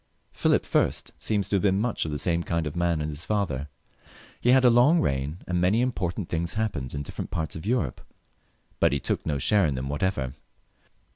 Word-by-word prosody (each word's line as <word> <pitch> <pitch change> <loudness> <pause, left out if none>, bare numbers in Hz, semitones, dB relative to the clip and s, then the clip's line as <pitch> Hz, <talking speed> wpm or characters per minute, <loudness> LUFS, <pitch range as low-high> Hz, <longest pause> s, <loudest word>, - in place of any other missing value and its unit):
Philip - - +2
I. - - +4 0.3
seems 105 -3 0
to 100 - +2
have - - -1
been 95 -1 +2
much 115 -4 -1
the 75 -2 -2
same 85 +3 0
kind 85 -1 -1
of 75 - -4
man 85 -2 +1
as 75 - -3
his 75 +2 -4
father. 85 -10 -1 0.7
He 120 - +1
had 130 0 +6
a 125 - +7
long 125 +9 +5
reign, 70 - -1
and 90 -1 0
many 95 +5 +3
im 125 +1 +2
portant 90 -3 -3
things 85 +2 -2
happened 100 - -2
in 70 - -3
different - - -6
parts 80 -1 -3
of 80 +5 -7
Europe, 115 - 0 0.8
but - - +3
he 70 - +1
took - - -2
no 75 -2 0
share 100 +5 +3
in 70 - -1
them 65 +1 -4
whatever. 75 -4 -1
85 Hz, 210 wpm, -26 LUFS, 75-105 Hz, 0.8 s, a